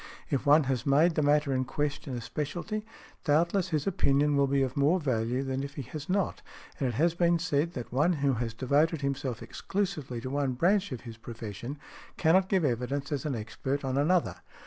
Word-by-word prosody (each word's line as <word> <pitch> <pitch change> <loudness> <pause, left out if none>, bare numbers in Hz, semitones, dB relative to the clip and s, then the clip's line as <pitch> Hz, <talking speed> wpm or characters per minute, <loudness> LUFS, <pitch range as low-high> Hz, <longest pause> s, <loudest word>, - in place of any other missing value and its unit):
If 140 0 0
one 150 +2 +7
has 130 -3 -1
made 150 +5 +4
the 155 - +1
matter 145 -1 +3
in 130 0 +1
question 140 -1 -3
a - - -5
specialty, 175 - -4 0.4
doubtless 170 +5 +2
his 155 -4 0
opinion 145 -6 +2
will 140 0 +3
be 135 0 +2
of 130 -1 -3
more 150 +6 +3
value 125 -3 0
than 135 0 -2
if 140 +1 -6
he 140 - -4
has 155 +1 -6
not; 195 +1 0 0.4
and 135 - +1
it 120 - -4
has 165 +6 +3
been 170 0 +3
said, 165 -1 0
that 120 -4 -6
one 150 +7 +3
who 140 -3 +1
has 115 -1 -3
devoted 145 +5 +2
himself 135 -4 -2
exclusively 180 -11 -3
to 130 - -5
one 140 -2 0
branch 190 +8 +2
of 125 - -5
his 115 -2 -9
profession 115 +3 -7 0.4
cannot 185 +3 +4
give 190 -5 +2
evidence 135 +3 -1
as 145 -2 -2
an 140 - -1
expert 135 +6 -3
on 130 0 -1
another. 165 +5 +2
140 Hz, 200 wpm, -29 LUFS, 130-165 Hz, 0.4 s, one